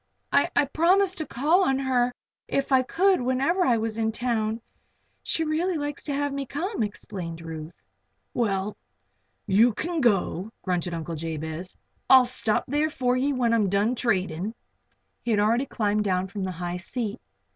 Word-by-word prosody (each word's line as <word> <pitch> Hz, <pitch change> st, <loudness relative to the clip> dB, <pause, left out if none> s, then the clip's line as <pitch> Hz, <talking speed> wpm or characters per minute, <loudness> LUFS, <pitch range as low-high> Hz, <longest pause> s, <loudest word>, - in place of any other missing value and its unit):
"I -, -, +3 dB
I 285 Hz, -, +4 dB
promised 365 Hz, +6 st, +2 dB
to 315 Hz, -, -3 dB
call 315 Hz, +9 st, +3 dB
on 270 Hz, -7 st, +2 dB
her 255 Hz, -2 st, +1 dB, 0.4 s
if 275 Hz, 0 st, -1 dB
I 260 Hz, -1 st, +6 dB
could 370 Hz, +7 st, +2 dB
whenever 265 Hz, +9 st, +1 dB
I 245 Hz, -8 st, +3 dB
was 225 Hz, 0 st, -2 dB
in 220 Hz, 0 st, +1 dB
town. 225 Hz, -1 st, -1 dB, 0.6 s
She 325 Hz, -, -1 dB
really 325 Hz, +3 st, 0 dB
likes 290 Hz, -1 st, -4 dB
to 290 Hz, -, -2 dB
have 285 Hz, 0 st, -1 dB
me 275 Hz, -1 st, -3 dB
come," 355 Hz, -, -3 dB
explained 190 Hz, -5 st, -4 dB
Ruth. 160 Hz, 0 st, -8 dB, 0.5 s
"Well, 205 Hz, -3 st, 0 dB, 0.7 s
you 215 Hz, +4 st, +4 dB
can 335 Hz, +3 st, -2 dB
go," 200 Hz, -4 st, +1 dB
grunted 180 Hz, -2 st, -1 dB
Uncle 165 Hz, 0 st, -5 dB
Jabez. 160 Hz, +2 st, -5 dB, 0.3 s
"I'll 260 Hz, -1 st, +8 dB
stop 245 Hz, -3 st, 0 dB
there 295 Hz, +3 st, +1 dB
for 250 Hz, -4 st, 0 dB
ye 270 Hz, +3 st, +1 dB
when 245 Hz, -4 st, +1 dB
I'm 215 Hz, -4 st, +3 dB
done 200 Hz, +5 st, +2 dB
tradin'." 190 Hz, -3 st, -1 dB, 0.7 s
He -, -, -5 dB
had 215 Hz, -2 st, +3 dB
already 230 Hz, +6 st, +2 dB
climbed 210 Hz, -2 st, 0 dB
down 185 Hz, -2 st, +1 dB
from 200 Hz, -1 st, -4 dB
the 185 Hz, -, -2 dB
high 175 Hz, +1 st, -4 dB
seat. 220 Hz, +4 st, -4 dB
235 Hz, 165 wpm, -26 LUFS, 195-280 Hz, 0.7 s, I'll